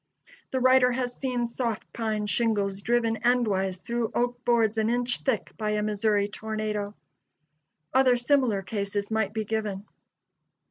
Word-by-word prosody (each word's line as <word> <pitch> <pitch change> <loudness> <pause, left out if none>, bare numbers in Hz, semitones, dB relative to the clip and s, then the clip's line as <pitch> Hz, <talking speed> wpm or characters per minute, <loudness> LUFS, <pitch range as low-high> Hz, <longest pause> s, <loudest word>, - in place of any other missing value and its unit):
The 260 - -1
writer 255 0 +5
has 245 0 -2
seen 250 -3 -1
soft 235 -2 -4
pine 215 -2 -2
shingles 205 -2 0
driven 230 0 +1
endwise 200 -7 +1
through 235 -1 -1
oak 245 0 -1
boards 225 -2 +2
an 220 0 +1
inch 245 +1 +1
thick 240 -8 -1
by 215 -1 -1
a 210 0 0
Missouri 210 -1 +1
tornado. 210 -1 -4 1.0
Other 255 -1 +5
similar 240 -5 +2
cases 200 +1 -3
might 220 -2 0
be 220 0 -3
given. 210 -2 -3
220 Hz, 140 wpm, -27 LUFS, 210-245 Hz, 1.0 s, writer